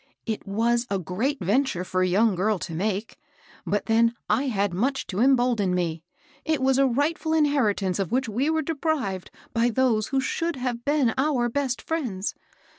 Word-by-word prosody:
^^It 220 -2 -4
was 235 +4 +1
a 200 - 0
great 215 - -2
venture 205 0 +1
for 185 0 -1
a 185 - +3
young 205 +4 +3
girl 200 +3 +1
to 170 -1 -6
make; 200 +5 -2 0.5
but 205 - 0
then 230 +1 +3
I 275 - +1
had 200 -6 0
much 260 +9 0
to 195 - -4
embolden 245 -7 +3
me. 165 -3 -1 0.4
It 315 -2 0
was 265 0 +2
a 275 - +5
rightful 305 +5 0
inherit 285 -10 +2
ance 185 0 -1
of 195 +1 -2
which 260 +1 +1
we 245 +8 0
were 320 0 +1
deprived 285 - -2 0.2
by 235 +1 +2
those 230 -3 +1
who 270 - 0
should 330 +5 -1
have 250 -2 -3
been 285 -5 +2
our 265 -4 +1
best 260 -1 -2
friends. 240 - -2
235 Hz, 185 wpm, -25 LUFS, 200-275 Hz, 0.5 s, a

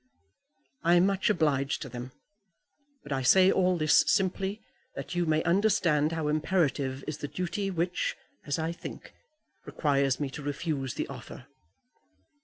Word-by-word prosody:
"I 170 0 +4
am 175 +1 +5
much 195 0 +1
obliged 145 -7 +1
to - - -7
them. 125 +1 -7 0.9
But 145 - -11
I 135 -1 0
say 185 +8 +6
all 185 -1 +2
this 155 -2 +4
simply 195 +1 0 0.4
that - - -6
you 175 -1 0
may 155 0 +2
understand 170 -5 +2
how 160 -2 -2
imperative 150 -4 0
is 155 -1 -5
the 145 - -4
duty 185 +5 -3
which, 175 -1 -1 0.3
as 145 - -2
I 160 0 -1
think, 170 - -9 0.5
requires 140 -3 0
me 140 -2 -2
to 150 - -7
refuse 145 -2 -3
the - - -2
offer." - - -10
160 Hz, 150 wpm, -28 LUFS, 145-180 Hz, 0.9 s, say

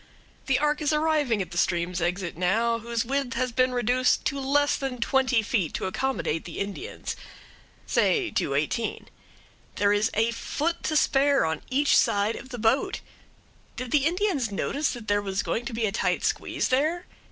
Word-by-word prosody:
The 270 -2 +3
ark 300 +1 +1
is 300 - +1
arriving 300 -8 +1
at - - -14
the 175 - -1
stream's 175 -1 0
exit 175 0 -2
now, 225 +7 +1
whose 235 +1 -2
width 270 0 -1
has 255 0 0
been 255 +2 +2
reduced 250 +1 +1
to 275 - -1
less 285 +2 +2
than 270 -2 -3
twenty 255 -1 +2
feet 200 -7 -1
to - - -2
accommodate 190 -5 -2
the 170 - -8
Indians 280 - -5 0.7
say 395 -7 +2
to 140 - -1
eighteen. 155 +10 -2 0.7
There 205 0 +3
is 205 +2 +2
a 225 +2 +2
foot 330 +8 -2
to 310 - 0
spare 280 - +3
on 160 -1 -2
each 280 +2 +3
side 205 +2 +2
of 260 - -9
the 245 - -6
boat. 225 +4 +1 0.7
Did 255 -1 -5
the 295 -1 +3
Indians 345 - 0
notice 280 +8 -1
that 235 -3 -9
there 205 0 +2
was 195 -1 -2
going 235 - -2
to 235 - -5
be 225 0 0
a 205 - 0
tight 200 - 0
squeeze - - -1
there? 310 +7 +1
245 Hz, 180 wpm, -26 LUFS, 205-280 Hz, 0.7 s, The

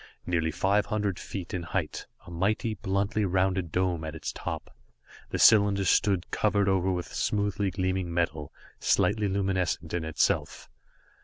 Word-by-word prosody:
Nearly 85 -2 0
five 100 +6 +1
hundred 105 -3 -1
feet 95 -4 -6
in 90 - -2
height, 85 -1 -3 0.2
a 85 - -11
mighty, 105 +6 0
bluntly 100 +1 -1
rounded 95 -2 0
dome 90 -2 0
at 80 0 -5
its 80 - -4
top, - - -6 0.5
the - - -2
cylinder 100 -2 +5
stood, 95 -1 +2
covered 100 -2 +1
over 95 -1 +2
with 90 -1 -4
smoothly 100 -1 0
gleaming 95 -1 -1
metal, 80 -4 -1 0.3
slightly 105 -2 +2
luminescent 95 -4 -1
in 85 -2 -1
itself. 80 -1 -1
95 Hz, 145 wpm, -28 LUFS, 85-100 Hz, 0.5 s, cylinder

